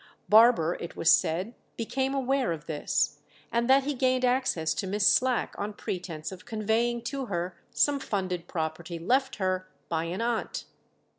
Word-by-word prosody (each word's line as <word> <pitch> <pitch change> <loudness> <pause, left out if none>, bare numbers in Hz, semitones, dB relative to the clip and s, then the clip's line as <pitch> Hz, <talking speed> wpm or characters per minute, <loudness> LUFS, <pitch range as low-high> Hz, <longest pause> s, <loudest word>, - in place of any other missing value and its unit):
Barber, 215 -7 +6
it 170 - -7
was 160 - +4
said, 180 +7 +2 0.2
became 265 +4 -1
aware 270 -4 +1
of 165 -1 -5
this, 155 -3 -1 0.3
and 235 +1 0
that 270 +1 +6
he 290 +2 -1
gained 255 -1 +2
access 245 -11 +1
to 195 - -3
Miss 200 +1 0
Slack 255 -1 +3
on 205 +1 -3
pretence 175 -5 -5
of 185 -1 -10
conveying 230 +1 0
to 270 +1 -4
her 175 -2 -3
some 285 -1 +2
funded 185 -7 -3
property 170 +1 -4
left 260 +10 +1
her 185 -1 -1 0.2
by 165 -1 -1
an 175 +3 -4
aunt. 235 0 -2
210 Hz, 160 wpm, -28 LUFS, 175-255 Hz, 0.3 s, Barber